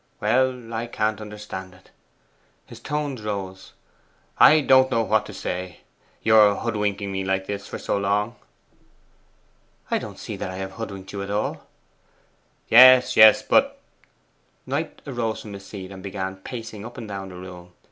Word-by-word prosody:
Well, 125 -2 0
I 115 +1 -3
can't 110 -2 -2
understand 105 -3 -8
it.' 95 - -22 0.7
His - - -13
tones 145 -4 -3
rose. 95 -3 -6 0.7
'I 155 0 +7
don't 130 -1 +5
know 115 -3 +1
what 110 -1 +1
to - - -8
say, 90 0 -5 0.4
your 105 -2 +6
hoodwinking 105 -3 -2
me 95 0 -3
like 95 0 -1
this 100 0 -5
for - - -6
so - - -2
long!' 105 +4 0 1.6
'I - - +2
don't - - -9
see - - -7
that - - -5
I 95 - -6
have 95 0 -5
hoodwinked 100 -3 -8
you 100 - -4
at 100 - -6
all.' 105 +1 -3 1.0
'Yes, 130 +1 +7
yes, 110 +4 +8
but' 275 - +2 0.9
Knight - - -4
arose 120 -5 -3
from 105 - -9
his 100 -1 -10
seat, 95 -2 -8
and 95 -1 -10
began 95 -1 -5
pacing 110 0 -8
up 120 +2 -10
and 110 - -7
down 95 -2 -6
the 90 - -11
room. 90 -1 -11
105 Hz, 160 wpm, -23 LUFS, 95-115 Hz, 1.6 s, yes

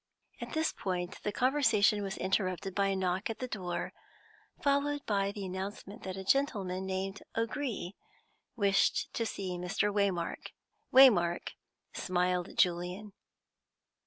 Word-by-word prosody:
At - - -6
this 320 0 +1
point 180 -1 -3
the 210 - -1
conversation 225 -5 +3
was 195 -1 -4
interrupted 190 0 -1
by 200 0 +2
a 195 - +1
knock 185 +2 -1
at 225 - -3
the 255 - -4
door, 180 -7 -4 0.7
followed 285 0 +1
by 200 -1 +1
the 205 -1 -6
announcement 195 +3 -6
that 190 0 -5
a 190 - -5
gentleman 195 -7 0
named 190 +1 -3 0.2
O'Gree 230 -5 -2 0.6
wished 200 -4 +2
to 230 - -1
see 185 -4 -4
Mr. 200 +3 0
Waymark. 195 -4 -1 0.4
Waymark 190 -10 +6 0.4
smiled 180 -1 0
at - - -14
Julian. 180 +4 +1
195 Hz, 130 wpm, -32 LUFS, 185-220 Hz, 0.7 s, Waymark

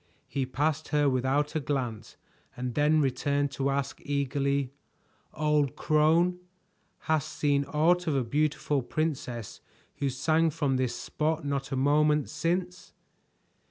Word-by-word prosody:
He 135 -2 -2
passed 150 +4 -1
her 150 -1 +2
without 135 +3 +1
a 160 - 0
glance 130 -6 -3 0.4
and 125 0 -3
then 150 +2 +3
returned 140 +1 0
to 140 0 -1
ask 140 0 -2
eagerly: 140 -1 -1 0.6
"Old 150 -3 +1
crone, 165 +4 +3 0.6
hast 155 -3 0
seen 140 -1 +1
aught 165 +5 +2
of 155 - +1
a 135 - +1
beautiful 145 +2 0
princess 125 - -3 0.4
who 140 - 0
sang 160 +5 +2
from 145 -4 0
this 130 -2 -1
spot 155 0 -2
not 140 0 -2
a - - 0
moment 150 +2 +2
since?" 175 +3 -2
145 Hz, 130 wpm, -28 LUFS, 135-155 Hz, 0.6 s, then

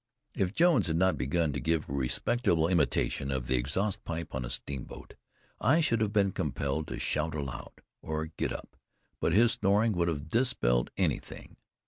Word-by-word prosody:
If 95 +1 -1
Jones 175 - +4
had 80 - 0
not 95 +2 +3
begun 75 +4 0
to 70 - -2
give 80 -1 0
a - - -5
respectable 80 - +1
imitation 75 -5 +1
of 65 -2 -2
the 65 - -1
exhaust 75 - -1
pipe 85 -1 -5
on 65 - -2
a - - -5
steamboat, 65 0 -5 0.5
I 130 +9 +4
should 115 -9 +2
have 105 -2 +1
been 100 -2 +2
compelled 75 -2 -2
to - - -5
shout 75 +1 -1
aloud, 70 -4 -6 0.2
or 80 0 -3
get 80 -1 -3
up; - - -8 0.4
but 80 - +1
this 115 +4 +5
snoring 105 +3 +2
would 85 -3 0
have 75 -2 -3
dispelled 80 - +2
anything. - - -2
80 Hz, 175 wpm, -30 LUFS, 70-100 Hz, 0.5 s, this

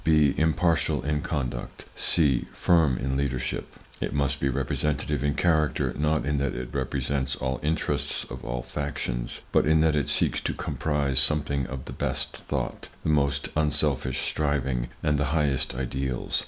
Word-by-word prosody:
(b). 75 -3 +4
Impartial 80 +1 +2
in 75 0 0
conduct. 65 -7 -4
(c). 70 -7 +2
Firm 80 -7 +3
in 65 +2 -1
leadership. 65 -2 -2 0.3
It - - -2
must 70 0 +1
be 70 - +1
representative 70 +2 -1
in 75 +1 +1
character; 80 -5 +2
not 75 -2 +1
in 70 0 +1
that 70 -2 -1
it 60 0 -4
represents 70 0 -1
all 65 -1 -2
interests 80 +2 0
or - - -7
all - - -3
factions, 65 -3 -3
but - - +3
in 80 0 +5
that 80 -1 +3
it 75 - +1
seeks - - +1
to - - -2
comprise 70 -4 0
something 70 -3 +1
of 65 -1 -6
the - - -7
best - - -2
thought, - - -4
the - - 0
most 70 -2 +2
unselfish 75 -4 +1
striving 70 -5 0 0.2
and 75 -1 +2
the 75 - +2
highest 70 -5 0
ideals. 65 0 -1
70 Hz, 160 wpm, -27 LUFS, 65-75 Hz, 0.3 s, in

